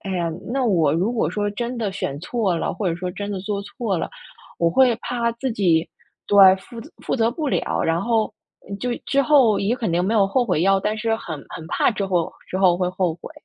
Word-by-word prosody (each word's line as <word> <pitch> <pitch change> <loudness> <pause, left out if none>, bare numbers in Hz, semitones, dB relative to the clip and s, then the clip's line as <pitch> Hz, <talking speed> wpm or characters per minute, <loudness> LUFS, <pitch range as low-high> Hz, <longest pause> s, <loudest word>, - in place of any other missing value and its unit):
哎 195 - -6
呀， 170 -2 -1 0.2
那 265 0 0
我 170 -10 +3
如 190 +8 0
果 235 - 0
说 205 0 -1
真 235 +4 -4
的 210 -4 -2
选 145 -7 -4
错 195 -2 -1
了， - - -2
或 200 - -1
者 165 - -2
说 180 +1 -4
真 200 +2 -5
的 200 - -3
做 200 +1 -3
错 205 -2 -3
了， - - -3 0.5
我 170 -1 +2
会 245 +5 +4
怕 235 -1 -1
自 245 +2 -3
己 175 -7 +2 0.4
对， 195 -2 +7
负 230 +4 -11
责 - - -12
负 - - -1
责 230 -1 +2
不 300 +5 -4
了， - - -1
然 165 +1 +1
后 225 -1 +1 0.4
嗯， 200 - -5
就 250 +4 -2 0.2
之 275 - +2
后 265 -7 +4
也 215 +5 0
肯 225 -8 -2
定 175 +1 +2
没 210 +4 0
有 200 -3 +4
后 245 +5 +1
悔 180 -7 0
药， 195 0 +3
但 210 +2 -1
是 225 +1 0
很 160 -8 -7
很 160 - -8
怕 - - +2
之 200 -3 -2
后 175 -3 0 0.2
之 185 - -3
后 185 -2 +4
会 180 -1 +1
后 180 -3 -1
悔。 175 - -11
200 Hz, 260 characters per minute, -22 LUFS, 180-230 Hz, 0.5 s, 对